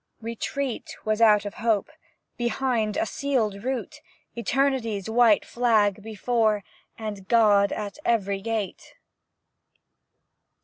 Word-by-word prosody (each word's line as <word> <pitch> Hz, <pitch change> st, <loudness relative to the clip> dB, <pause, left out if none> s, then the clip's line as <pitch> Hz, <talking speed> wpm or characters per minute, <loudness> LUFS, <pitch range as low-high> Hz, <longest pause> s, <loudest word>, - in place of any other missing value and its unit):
Retreat 235 Hz, +3 st, -4 dB
was 215 Hz, +1 st, 0 dB
out 210 Hz, -2 st, +5 dB
of 205 Hz, -, -5 dB
hope, 225 Hz, +3 st, +1 dB, 0.4 s
Behind, 240 Hz, -3 st, -1 dB
a -, -, +1 dB
sealed 220 Hz, -5 st, -1 dB
route, 260 Hz, 0 st, -4 dB, 0.3 s
Eternity's 235 Hz, -3 st, 0 dB
white 225 Hz, -2 st, +4 dB
flag 220 Hz, -4 st, +2 dB
before, 220 Hz, 0 st, 0 dB, 0.3 s
And 205 Hz, -4 st, -6 dB
God 205 Hz, -3 st, +4 dB
at 210 Hz, +4 st, -5 dB
every 200 Hz, -4 st, 0 dB
gate. 220 Hz, -2 st, -4 dB
220 Hz, 100 wpm, -25 LUFS, 205-240 Hz, 0.4 s, out